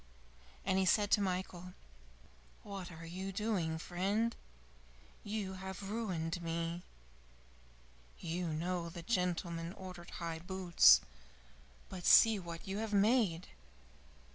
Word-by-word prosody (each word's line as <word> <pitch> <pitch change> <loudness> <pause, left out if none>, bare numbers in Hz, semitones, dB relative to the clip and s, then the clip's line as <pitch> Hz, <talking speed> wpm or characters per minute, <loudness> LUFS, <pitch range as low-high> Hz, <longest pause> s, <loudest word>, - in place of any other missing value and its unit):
And 190 0 +2
he 190 - +2
said 205 +2 +3
to 210 - +5
Michael, 180 -1 -3 0.9
"What 195 -3 -7
are 165 0 -9
you 190 +3 -5
doing, 195 -6 -1
friend? 200 +7 -1 0.9
You 205 -2 -3
have 190 +1 -6
ruined 180 -6 -2
me! 165 +1 -3 1.4
You 170 +2 -3
know 170 +2 -2
the 170 0 -8
gentleman 175 -3 -1
ordered 180 -3 -9
high 165 -2 -4
boots, 175 - +6 0.9
but 185 -2 -5
see 225 -2 +7
what 170 -1 -8
you 195 +2 -3
have 220 -1 -3
made!" 200 -4 +3
180 Hz, 115 wpm, -35 LUFS, 170-195 Hz, 1.4 s, see